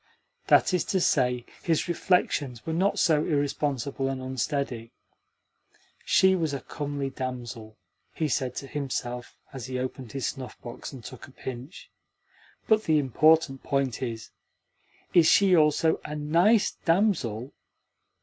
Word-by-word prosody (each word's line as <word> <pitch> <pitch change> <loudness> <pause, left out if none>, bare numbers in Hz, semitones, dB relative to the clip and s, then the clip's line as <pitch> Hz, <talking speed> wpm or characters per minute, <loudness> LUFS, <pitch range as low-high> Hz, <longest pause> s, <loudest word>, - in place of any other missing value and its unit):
That - - +5
is 180 - +2
to 190 - 0
say, 125 -7 +1 0.2
his 165 0 0
reflections 150 -8 0
were 160 - -2
not 190 +5 +1
so 155 -3 +3
irresponsible 140 -3 -1
and 135 -1 -3
unsteady. 130 -2 -3 1.1
"She 190 0 +4
was 160 -5 -1
a - - -3
comely 145 -2 -4
damsel," 120 -4 -6 0.4
he 155 - 0
said 130 -2 -1
to - - -5
himself 125 -4 -4 0.2
as 130 -2 -6
he 130 -1 -3
opened 130 -2 -5
his 135 -3 -3
snuff 130 -2 -5
box 120 0 -8
and 130 -4 -10
took 130 0 -10
a - - -16
pinch. 130 +5 -9 0.8
"But 215 -1 +3
the 155 -1 +3
important 150 +1 +3
point 135 -4 -1
is: 115 -3 -5 0.8
Is 170 -2 +6
she 190 +1 +5
also 160 0 +3
a 150 - -5
NICE 170 +9 +3
DAMSEL? 160 - +1
140 Hz, 140 wpm, -27 LUFS, 125-160 Hz, 1.1 s, Is